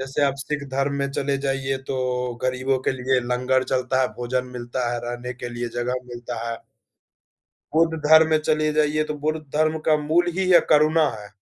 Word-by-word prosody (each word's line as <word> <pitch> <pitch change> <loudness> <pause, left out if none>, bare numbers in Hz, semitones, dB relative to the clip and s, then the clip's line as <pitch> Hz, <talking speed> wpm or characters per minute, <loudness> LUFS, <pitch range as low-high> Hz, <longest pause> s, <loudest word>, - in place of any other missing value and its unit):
जैसे 135 +2 -2
आप 140 -1 +1
सिख 145 +1 -3
धर्म 135 +1 0
में 140 - -1
चले 140 0 -1
जाइए, 135 -1 -1
तो 125 -2 -2
गरीबों 130 +1 0
के - - +2
लिए 130 0 +1
लंगर 125 +1 +1
चलता 130 0 0
है, 130 - +2
भोजन 125 +1 -2
मिलता 120 +1 -3
है, 120 - -2
रहने 120 +1 -5
के 125 0 -6
लिए 120 0 -4
जगह 125 +1 -2
मिलता 120 -1 -6
है। 115 - -3 1.2
बुद्ध 160 0 +3
धर्म 160 +1 +7
में 155 -1 +3
चले 155 0 +1
जाइए, 155 0 +2
तो 150 - -4
बुद्ध 155 +2 -1
धर्म 155 +1 +2
का 155 -1 +4
मूल 160 +4 +1
ही 190 0 0
यह 175 - +9
करुणा 155 +1 +4
है। 105 - -10
135 Hz, 195 wpm, -23 LUFS, 125-155 Hz, 1.2 s, यह